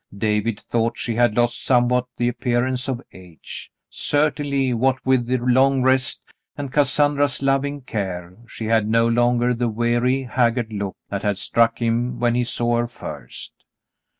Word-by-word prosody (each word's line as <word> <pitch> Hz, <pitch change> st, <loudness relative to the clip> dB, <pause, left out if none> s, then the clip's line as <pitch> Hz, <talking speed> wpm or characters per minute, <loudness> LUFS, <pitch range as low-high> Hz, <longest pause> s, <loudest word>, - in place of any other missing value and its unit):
David 105 Hz, +1 st, 0 dB
thought 115 Hz, 0 st, -1 dB
she 120 Hz, -, -2 dB
had 120 Hz, -1 st, +2 dB
lost 120 Hz, 0 st, +1 dB
somewhat 125 Hz, 0 st, +2 dB
the 120 Hz, -, +1 dB
appearance 125 Hz, +1 st, -1 dB
of 130 Hz, -1 st, -3 dB
age; 90 Hz, -4 st, -11 dB, 0.2 s
certainly, 145 Hz, -3 st, 0 dB
what 130 Hz, +3 st, +2 dB
with 130 Hz, -2 st, +2 dB
the 130 Hz, +1 st, +1 dB
long 130 Hz, +2 st, +3 dB
rest, 130 Hz, 0 st, +1 dB, 0.3 s
and 140 Hz, -2 st, -5 dB
Cassandra's 145 Hz, -1 st, +2 dB
loving 140 Hz, +1 st, 0 dB
care, 90 Hz, -7 st, -5 dB
she 115 Hz, -, -7 dB
had 110 Hz, -1 st, +2 dB
no 115 Hz, +1 st, +3 dB
longer 120 Hz, +1 st, +2 dB
the 120 Hz, 0 st, -1 dB
weary, 120 Hz, +4 st, +1 dB
haggard 120 Hz, -2 st, 0 dB
look 100 Hz, -2 st, -4 dB
that 100 Hz, -, -3 dB
had 105 Hz, -2 st, 0 dB
struck 115 Hz, +3 st, +1 dB
him 120 Hz, +1 st, -1 dB
when 120 Hz, 0 st, +2 dB
he 125 Hz, +1 st, +1 dB
saw 120 Hz, 0 st, 0 dB
her 120 Hz, 0 st, 0 dB
first. -, -, -9 dB
120 Hz, 155 wpm, -22 LUFS, 115-130 Hz, 0.3 s, long